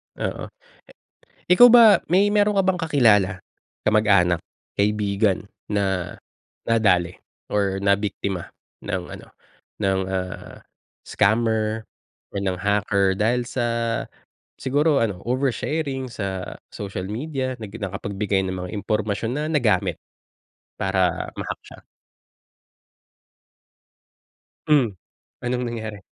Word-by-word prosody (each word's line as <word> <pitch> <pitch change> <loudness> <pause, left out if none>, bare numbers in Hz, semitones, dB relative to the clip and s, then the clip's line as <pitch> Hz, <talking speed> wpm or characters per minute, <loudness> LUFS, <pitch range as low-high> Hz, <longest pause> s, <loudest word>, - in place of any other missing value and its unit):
Oo. - - -4 1.0
Ikaw 245 +8 +9
ba 240 -1 +9 0.3
may 200 +3 +5
meron 205 0 +2
ka - - +2
bang 185 -2 +1
kakilala, 115 - +4 0.6
kamag-anak, 100 -5 +4 0.4
kaibigan, 100 -1 +1 0.2
na 95 -3 0 0.6
nadali 90 -6 +2 0.3
or 100 -2 0
nabiktima 100 -2 -1 0.3
ng - - -3
ano, - - -15 0.5
ng, 95 -2 +1
ah, 95 -1 -5 0.5
scammer 110 +1 +1 0.4
or - - -3
ng 95 -1 -1
hacker 100 -1 +1
dahil 120 +4 +1
sa 120 -1 -1 0.9
siguro 145 +2 +2
ano, 100 -5 -3
oversharing 135 +2 -1
sa 95 -5 -5 0.2
social 100 -2 -5
media, 130 +1 -3
nag 105 -2 -8
nakapagbigay 100 -1 -2
ng 95 - -3
mga 90 0 -5
impormasyon 105 +2 -1
na 150 - -1
nagamit 125 -8 +1 0.8
para 95 -2 +1
ma-hack - - -5
siya? - - -13 2.8
Hmm, 135 -10 +3 0.5
anong 125 0 -1
nangyari? 110 -3 -5
105 Hz, 100 wpm, -23 LUFS, 95-125 Hz, 2.8 s, Ikaw